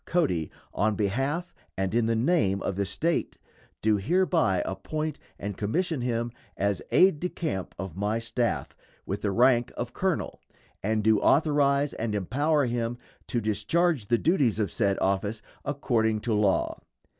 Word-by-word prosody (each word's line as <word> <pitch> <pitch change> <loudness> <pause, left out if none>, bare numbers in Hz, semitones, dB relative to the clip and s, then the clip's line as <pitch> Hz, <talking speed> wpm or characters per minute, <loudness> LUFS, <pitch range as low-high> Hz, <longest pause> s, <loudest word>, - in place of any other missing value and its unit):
Cody, 120 - 0 0.2
on 110 0 +1
behalf 135 - -1 0.2
and 95 +1 -1
in 115 -1 +2
the 115 - +2
name 110 - +2
of 95 - -2
the 100 0 -1
State 165 - -1 0.5
do 110 -1 +4
hereby 165 - +2
appoint 155 +12 -3 0.2
and 100 -1 -5
commission 155 - -1
him 120 -1 -1 0.3
as 100 -1 0
aide 185 -5 +5
de 180 - -2
camp 145 - -4
of 95 -3 -6
my 105 +3 0
staff, 115 +1 -2 0.3
with 100 - -3
the 105 - 0
rank 120 +3 +3
of 120 0 -4
colonel, 190 -3 -1 0.4
and 110 +1 0
do 110 -1 +4
authorize 145 -1 +3
and 110 -2 -2
empower 145 - +1
him 120 0 -2 0.3
to 120 - 0
discharge 115 - +1
the 120 - +3
duties 140 - +2
of 105 -3 0
said 100 -4 +1
office 100 +3 0 0.2
according 115 -6 0
to 115 -1 -1
law. 105 -2 +1
115 Hz, 155 wpm, -27 LUFS, 100-145 Hz, 0.5 s, aide